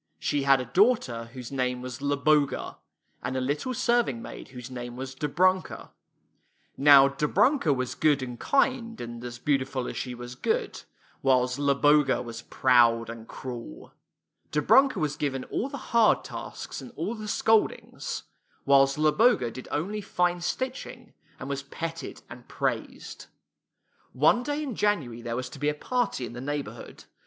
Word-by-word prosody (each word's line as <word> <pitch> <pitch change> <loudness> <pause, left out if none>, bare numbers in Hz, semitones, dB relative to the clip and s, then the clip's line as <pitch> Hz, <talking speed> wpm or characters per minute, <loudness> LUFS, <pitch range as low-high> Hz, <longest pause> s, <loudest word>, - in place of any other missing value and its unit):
She 145 - -1
had 135 -1 +4
a 125 - -3
daughter 130 - +2
whose 125 -2 -8
name 125 -2 -1
was 125 -1 -6
Zloboga, 145 +1 +1 0.4
and 130 - -3
a - - +1
little 145 - -2
serving 235 - +1
maid - - -9
whose 125 -1 -10
name 120 -1 -6
was 130 +1 -6
Dobrunka. 180 +7 0 0.8
Now 140 -1 +7
Dobrunka 160 - +2
was 130 -2 -1
good 145 -3 +2
and 125 -2 -7
kind, 255 -4 +1
and 120 0 -7
as 120 -1 -6
beautiful 130 -1 -1
as - - -5
she 125 -1 -4
was 120 0 -8
good; 125 - -2 0.4
while 130 -2 +3
Zloboga 140 +1 +3
was 115 -1 -7
proud 120 -2 +3
and 115 -1 -10
cruel. 120 - -8 0.6
Dobrunka 255 - +4
was 150 -4 -1
given 135 -3 -2
all 260 - -1
the 280 - -6 0.2
hard 230 -2 +4
tasks, - - -7
and - - -10
all 225 - -3
the 215 -2 -7
scoldings, 220 +1 0 0.4
while 140 0 +6
Zloboga 150 - +3
did 130 - -9
only 195 +8 -2
fine 180 -2 0
stitching, 250 +3 -4 0.3
and 130 - -6
was 140 0 -3
petted 165 +4 -6
and - - -12
praised. - - -4 0.9
One 240 - +4
day 290 +3 -2
in 270 -4 -4
January 145 - 0
there 115 0 -4
was 125 +1 -3
to 140 - -11
be 145 +1 +1
a 150 - -2
party 245 - -1
in 115 - -8
the 120 - -7
neighborhood. 145 +1 -6
140 Hz, 155 wpm, -27 LUFS, 125-185 Hz, 0.9 s, Now